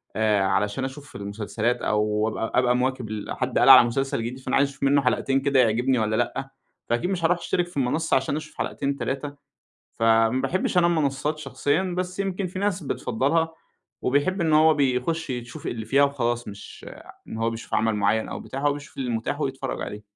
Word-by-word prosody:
آآ 110 Hz, -2 st, +2 dB
علشان 105 Hz, +6 st, 0 dB
أشوف 135 Hz, +1 st, -9 dB
المسلسلات، 105 Hz, +4 st, -2 dB
أو 105 Hz, 0 st, +1 dB
أبقى 115 Hz, +1 st, -4 dB
أبقى 125 Hz, -1 st, +3 dB
مواكب 125 Hz, -2 st, -1 dB
ال 110 Hz, -1 st, -5 dB
حد 130 Hz, -1 st, -1 dB
قال -, -, +5 dB
على 125 Hz, -3 st, +10 dB
مسلسل 135 Hz, +2 st, -1 dB
جديد 125 Hz, +3 st, -5 dB
فأنا 130 Hz, 0 st, -2 dB
عايز 140 Hz, 0 st, +3 dB
أشوف 140 Hz, 0 st, -10 dB
منه 140 Hz, +1 st, +4 dB
حلقتين 135 Hz, +1 st, +1 dB
كده 140 Hz, -1 st, +2 dB
يعجبني 125 Hz, +2 st, +2 dB
والّا 110 Hz, 0 st, 0 dB
لأ، 135 Hz, +3 st, -2 dB, 0.4 s
فأكيد 120 Hz, +9 st, 0 dB
مش 180 Hz, -3 st, -2 dB
هاروح 175 Hz, +1 st, +3 dB
أشترك 175 Hz, +1 st, -1 dB
في 175 Hz, -, -11 dB
المنصّة 140 Hz, +5 st, +1 dB
عشان 135 Hz, +2 st, -1 dB
أشوف 155 Hz, 0 st, -7 dB
حلقتين، 140 Hz, 0 st, -2 dB
3. 140 Hz, +1 st, -4 dB, 0.6 s
فما 115 Hz, 0 st, +4 dB
باحبش 180 Hz, +6 st, 0 dB
أنا 170 Hz, -, +5 dB
المنصّات 150 Hz, -2 st, 0 dB
شخصيًا 150 Hz, +2 st, -1 dB, 0.2 s
بس 185 Hz, +1 st, -3 dB
يمكن 195 Hz, -1 st, -2 dB
في 180 Hz, +1 st, -7 dB
ناس 200 Hz, -2 st, -1 dB
بتفضّلها، 145 Hz, +5 st, 0 dB, 0.5 s
وبيحب 145 Hz, +9 st, +1 dB
إن 165 Hz, -2 st, +1 dB
هو 155 Hz, +1 st, +6 dB
بيخش 140 Hz, +3 st, 0 dB
يشوف 120 Hz, -1 st, -6 dB
اللي 115 Hz, -2 st, -4 dB
فيها 140 Hz, +4 st, +4 dB
وخلاص، 120 Hz, -5 st, -1 dB
مش 100 Hz, 0 st, -11 dB, 0.4 s
إن -, -, -6 dB
هو 115 Hz, 0 st, 0 dB
بيشوف 115 Hz, 0 st, -6 dB
عمل 110 Hz, 0 st, +2 dB
معيّن 105 Hz, +2 st, +1 dB
أو -, -, -6 dB
بتاع، 135 Hz, -, -6 dB
هو 145 Hz, 0 st, +2 dB
بيشوف 145 Hz, 0 st, -10 dB
المتاح 125 Hz, +3 st, -2 dB
ويتفرّج 135 Hz, -2 st, -3 dB
عليه. 105 Hz, 0 st, -7 dB
135 Hz, 190 wpm, -24 LUFS, 115-150 Hz, 0.6 s, على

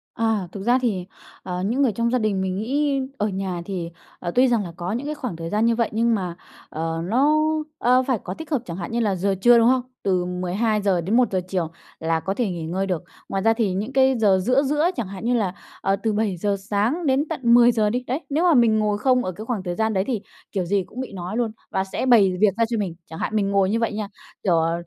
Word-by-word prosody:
À, 225 Hz, -5 st, 0 dB
thực 195 Hz, 0 st, -7 dB
ra 245 Hz, +3 st, +4 dB
thì, 195 Hz, -7 st, -1 dB, 0.4 s
ờ, 180 Hz, 0 st, -3 dB
những 240 Hz, +7 st, 0 dB
người 255 Hz, -5 st, +3 dB
trong 235 Hz, +3 st, -1 dB
gia 255 Hz, -, +2 dB
đình 210 Hz, -4 st, 0 dB
mình 185 Hz, -1 st, -1 dB
nghĩ 275 Hz, +5 st, 0 dB, 0.2 s
ở 210 Hz, -, 0 dB
nhà 190 Hz, -3 st, -3 dB
thì, 175 Hz, -3 st, -4 dB, 0.3 s
ờ, 175 Hz, -, -3 dB
tuy 255 Hz, +1 st, +5 dB
rằng 235 Hz, -4 st, +2 dB
là 170 Hz, -, -7 dB
có 175 Hz, +2 st, -3 dB
những 245 Hz, +6 st, -3 dB
cái 305 Hz, -, -3 dB
khoảng 250 Hz, -, -5 dB
thời 165 Hz, 0 st, -6 dB
gian 210 Hz, +3 st, +1 dB
như 230 Hz, 0 st, +3 dB
vậy 230 Hz, -1 st, +1 dB
nhưng 230 Hz, +1 st, +2 dB
mà, 180 Hz, -4 st, -3 dB, 0.3 s
ờ, 165 Hz, +1 st, -3 dB
nó, 275 Hz, -, +3 dB, 0.4 s
ờ, 255 Hz, +1 st, +3 dB
phải 255 Hz, -5 st, +1 dB
có 185 Hz, -, -4 dB
tích 320 Hz, +10 st, -9 dB
hợp, 280 Hz, -6 st, +1 dB
chẳng 170 Hz, 0 st, -6 dB
hạn 175 Hz, +4 st, -5 dB
như 235 Hz, -, 0 dB
là 210 Hz, -4 st, +1 dB
giờ 195 Hz, +2 st, 0 dB
trưa, 240 Hz, 0 st, +7 dB
đúng 230 Hz, 0 st, +5 dB
không? 255 Hz, 0 st, +3 dB, 0.2 s
Từ 185 Hz, -2 st, +1 dB
12:00 190 Hz, +2 st, 0 dB
đến 200 Hz, +8 st, +1 dB
1:00 200 Hz, -7 st, +2 dB
chiều 180 Hz, -3 st, -1 dB, 0.3 s
là 165 Hz, 0 st, 0 dB
có 190 Hz, +4 st, -2 dB
thể 220 Hz, -1 st, -1 dB
nghỉ 170 Hz, -3 st, -4 dB
ngơi 185 Hz, +4 st, -1 dB
được. 180 Hz, -3 st, -2 dB, 0.3 s
Ngoài 195 Hz, -, -1 dB
ra 225 Hz, +1 st, +5 dB
thì 220 Hz, -5 st, 0 dB
những 210 Hz, +7 st, -3 dB
cái 265 Hz, -1 st, +4 dB
giờ 200 Hz, -4 st, +4 dB
giữa 255 Hz, +9 st, +2 dB
giữa, 300 Hz, +4 st, +2 dB
chẳng 235 Hz, -6 st, -3 dB
hạn 195 Hz, +2 st, -7 dB
như 245 Hz, -, +2 dB
là, 205 Hz, -7 st, 0 dB, 0.3 s
ờ, 195 Hz, -, +2 dB
từ 215 Hz, +2 st, -1 dB
7:00 205 Hz, -2 st, 0 dB
sáng 215 Hz, -, -1 dB
đến 270 Hz, +2 st, +2 dB
tận -, -, -3 dB
10:00 235 Hz, -3 st, +5 dB
đi, 245 Hz, +3 st, -2 dB
đấy, 265 Hz, +6 st, -1 dB
nếu 300 Hz, +4 st, +1 dB
mà 355 Hz, -2 st, +5 dB
mình 230 Hz, -5 st, +4 dB
ngồi 210 Hz, -1 st, +1 dB
không 250 Hz, +3 st, +2 dB
ở 185 Hz, -, -2 dB
cái 215 Hz, +5 st, -9 dB
khoảng 225 Hz, -6 st, -2 dB
thời 175 Hz, -1 st, -3 dB
gian 220 Hz, +2 st, 0 dB
đấy 190 Hz, -1 st, +1 dB
thì 235 Hz, -6 st, -1 dB, 0.3 s
kiểu 190 Hz, -3 st, -1 dB
gì 195 Hz, +2 st, +1 dB
cũng 250 Hz, -, -10 dB
bị 260 Hz, -, -6 dB
nói 185 Hz, +3 st, -5 dB
luôn 235 Hz, -2 st, 0 dB, 0.2 s
và 190 Hz, -, 0 dB
sẽ 195 Hz, +6 st, -3 dB
bày 200 Hz, -7 st, +5 dB
việc 205 Hz, -1 st, +4 dB
ra 230 Hz, -, +3 dB
cho 230 Hz, -, -1 dB
mình. 185 Hz, -5 st, -2 dB
Chẳng 160 Hz, -, -9 dB
hạn 220 Hz, -, -2 dB
mình 200 Hz, -2 st, +1 dB
ngồi 195 Hz, -1 st, +3 dB
như 225 Hz, +3 st, +1 dB
vậy 230 Hz, -1 st, 0 dB
nha 210 Hz, -1 st, -3 dB, 0.4 s
kiểu, 180 Hz, -4 st, +3 dB
ờ, 165 Hz, +1 st, +1 dB
210 Hz, 265 wpm, -23 LUFS, 185-240 Hz, 0.4 s, trưa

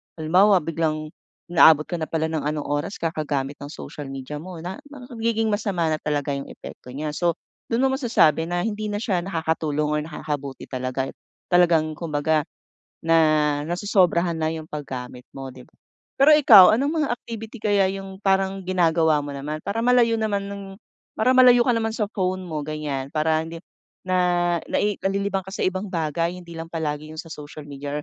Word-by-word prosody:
halimbawa 180 Hz, +4 st, +4 dB
biglang 155 Hz, -1 st, -2 dB, 0.4 s
inaabot 160 Hz, -3 st, +7 dB
ka 175 Hz, -, -4 dB
na 160 Hz, -, -3 dB
pala 160 Hz, -1 st, 0 dB
ng 160 Hz, -, -1 dB
anong 150 Hz, -1 st, -2 dB
oras 145 Hz, +7 st, -2 dB
kakagamit 145 Hz, -4 st, -2 dB
ng 140 Hz, -, -7 dB
social 150 Hz, -1 st, -8 dB
media 135 Hz, +2 st, -6 dB
mo 180 Hz, +2 st, -9 dB
na 185 Hz, +2 st, -6 dB
nagiging 230 Hz, -5 st, -2 dB
masama 200 Hz, -5 st, -1 dB
na 155 Hz, -, -1 dB
talaga 145 Hz, -1 st, -1 dB
'yung 140 Hz, 0 st, -5 dB
epekto -, -, -11 dB
niya 150 Hz, +1 st, -3 dB
so 170 Hz, +2 st, 0 dB, 0.3 s
dun 235 Hz, +3 st, 0 dB
mo 265 Hz, -, +3 dB
masasabi 225 Hz, -, +2 dB
na 175 Hz, 0 st, -1 dB
hindi 215 Hz, -1 st, -3 dB
na 205 Hz, -, -3 dB
siya 205 Hz, -3 st, 0 dB
nakakatulong 160 Hz, -4 st, -1 dB
or 150 Hz, -, +1 dB
nakakabuti 150 Hz, -3 st, -5 dB
talaga 130 Hz, +1 st, -3 dB, 0.4 s
talagang 170 Hz, -3 st, +4 dB
kumbaga 155 Hz, -1 st, 0 dB, 0.6 s
na, 155 Hz, -3 st, +3 dB
nasosobrahan 175 Hz, -1 st, +2 dB
na 160 Hz, 0 st, 0 dB
'yung 160 Hz, -1 st, -6 dB
paggamit 130 Hz, -4 st, -7 dB
mo 135 Hz, -1 st, -7 dB
'di 130 Hz, -1 st, -11 dB
ba. -, -, -28 dB, 0.5 s
Pero 290 Hz, +3 st, +7 dB
ikaw 220 Hz, -11 st, +8 dB
anong 295 Hz, +5 st, 0 dB
mga -, -, -5 dB
activity 225 Hz, -1 st, -8 dB
kaya 205 Hz, -2 st, +3 dB
'yung 195 Hz, -1 st, -8 dB
parang 195 Hz, -1 st, +1 dB
ginagawa 165 Hz, -4 st, +2 dB
mo 145 Hz, -, -6 dB
naman 145 Hz, +2 st, -5 dB
para 200 Hz, +3 st, -3 dB
malayo 235 Hz, -1 st, +3 dB
naman 210 Hz, -2 st, 0 dB
ng 200 Hz, 0 st, -6 dB, 0.5 s
para 220 Hz, +4 st, +2 dB
malayo 250 Hz, -1 st, +7 dB
ka 245 Hz, -, +1 dB
naman 225 Hz, -1 st, -1 dB
sa 210 Hz, -3 st, -2 dB
phone 185 Hz, -3 st, -1 dB
mo 155 Hz, -5 st, -5 dB
ganiyan, 150 Hz, -3 st, -3 dB
para 155 Hz, +1 st, +2 dB
hindi 165 Hz, +1 st, -9 dB, 0.4 s
na 175 Hz, -1 st, +1 dB
nai 205 Hz, -1 st, 0 dB
nalilibang 195 Hz, -1 st, -1 dB
ka 190 Hz, -, -8 dB
sa -, -, -3 dB
ibang 185 Hz, +2 st, -1 dB
bagay 165 Hz, -1 st, -1 dB
hindi 170 Hz, -1 st, -10 dB
lang 165 Hz, -, -5 dB
palagi 155 Hz, -2 st, -4 dB
'yung 160 Hz, -, -5 dB
sa 165 Hz, -, -15 dB
social 150 Hz, 0 st, -9 dB
media 145 Hz, +1 st, -5 dB
165 Hz, 180 wpm, -23 LUFS, 150-200 Hz, 0.6 s, ikaw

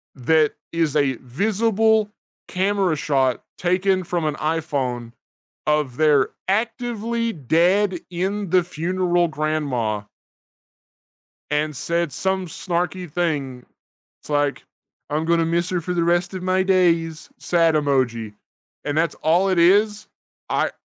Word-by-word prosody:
That 155 Hz, +4 st, +2 dB, 0.2 s
is 160 Hz, -3 st, 0 dB
a 140 Hz, -3 st, +3 dB
visible 215 Hz, -, +1 dB, 0.4 s
camera 190 Hz, -3 st, +1 dB
shot 135 Hz, -4 st, +1 dB
taken 185 Hz, +1 st, +1 dB
from 170 Hz, -2 st, -2 dB
an 150 Hz, -1 st, -1 dB
iPhone 140 Hz, -7 st, -2 dB, 0.5 s
of 150 Hz, -5 st, +1 dB
their 150 Hz, -2 st, +3 dB, 0.2 s
actively 230 Hz, +1 st, -1 dB
dead 175 Hz, -, +2 dB
in 190 Hz, +2 st, -2 dB
the 180 Hz, -1 st, +4 dB
funeral 175 Hz, +1 st, 0 dB
grandma. 140 Hz, -9 st, -1 dB, 1.5 s
And 150 Hz, 0 st, -1 dB
said 170 Hz, +2 st, -1 dB
some 190 Hz, +4 st, -1 dB
snarky 175 Hz, +1 st, -3 dB
thing, 140 Hz, -8 st, -2 dB, 0.6 s
it's, -, -, -15 dB
like, 145 Hz, -1 st, 0 dB, 0.4 s
I'm 155 Hz, +2 st, -1 dB
gonna 165 Hz, 0 st, +2 dB
miss 170 Hz, +2 st, 0 dB
her 180 Hz, -2 st, 0 dB
for 180 Hz, +2 st, -3 dB
the 170 Hz, -1 st, +1 dB
rest 175 Hz, +2 st, +1 dB
of 185 Hz, -1 st, -5 dB
my 185 Hz, 0 st, +2 dB
days, 170 Hz, -4 st, +1 dB
sad 165 Hz, -2 st, +2 dB
emoji, 125 Hz, -7 st, 0 dB, 0.5 s
and 145 Hz, +1 st, -1 dB
that's 165 Hz, +1 st, +1 dB
all 175 Hz, +5 st, +2 dB
it 185 Hz, -, +1 dB
is. 205 Hz, +4 st, +3 dB, 0.4 s
I -, -, +1 dB
170 Hz, 125 wpm, -22 LUFS, 150-185 Hz, 1.5 s, the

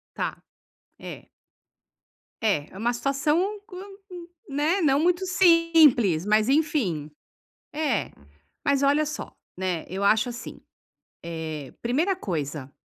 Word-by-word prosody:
Tá, -, -, -1 dB, 0.7 s
é. -, -, -9 dB, 1.1 s
É, 195 Hz, -10 st, 0 dB
é 190 Hz, -, -10 dB
uma 235 Hz, +3 st, +1 dB
situação, 275 Hz, +5 st, +1 dB, 0.2 s
um -, -, -14 dB
co 365 Hz, -, -11 dB, 0.7 s
né, 300 Hz, +7 st, +1 dB
não 280 Hz, -5 st, +3 dB
muito 355 Hz, +3 st, +1 dB
simples, 330 Hz, -, +4 dB
mas 215 Hz, +2 st, +3 dB
enfim. 265 Hz, -, 0 dB, 0.6 s
É. 290 Hz, -7 st, -1 dB, 0.5 s
Mas 280 Hz, 0 st, +2 dB
olha 290 Hz, +2 st, +3 dB
só, 305 Hz, -, -6 dB, 0.2 s
né, 180 Hz, -3 st, -2 dB
eu 190 Hz, +2 st, -3 dB
acho 215 Hz, +4 st, +3 dB
assim. 240 Hz, 0 st, -8 dB, 0.7 s
Eh, 160 Hz, -4 st, -6 dB
primeira 305 Hz, +12 st, +1 dB
coisa, 150 Hz, -, -4 dB
255 Hz, 115 wpm, -25 LUFS, 185-310 Hz, 1.1 s, simples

